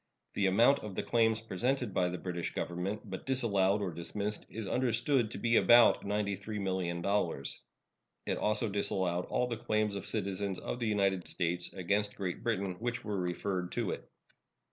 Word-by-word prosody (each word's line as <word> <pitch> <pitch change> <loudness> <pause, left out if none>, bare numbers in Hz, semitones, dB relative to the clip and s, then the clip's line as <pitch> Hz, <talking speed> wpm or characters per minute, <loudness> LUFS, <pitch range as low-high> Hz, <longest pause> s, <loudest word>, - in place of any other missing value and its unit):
The 100 - +2
amount 120 +9 +5
of 105 -3 -7
the - - -1
claims 115 -1 +3
presented 120 +2 -1
by 90 -1 +2
the 90 - -4
British 90 -1 -4
Government, 95 +5 -3
but 95 +4 -7
disallowed 105 -6 +2
or 95 - -2
dismissed, 100 +5 -4
is 110 -1 -5
understood 120 +1 +1
to - - -6
be 115 -1 +3
about 120 -1 +6
$93,000,000. 100 -5 -1 0.7
It - - -1
also 105 +1 +2
disallowed 95 -3 +1
all 125 - 0
the 120 -2 -3
claims 110 -1 0
of 100 - -5
citizens 100 -2 -2
of 125 - -4
the 115 - -1
United 100 -4 +1
States 90 0 -1
against 100 +3 0
Great 95 -3 -4
Britain 100 -5 -1
which 120 +1 -3
were 105 -2 -2
referred 90 0 -2
to - - -1
it. - - -7
100 Hz, 165 wpm, -32 LUFS, 95-110 Hz, 0.7 s, about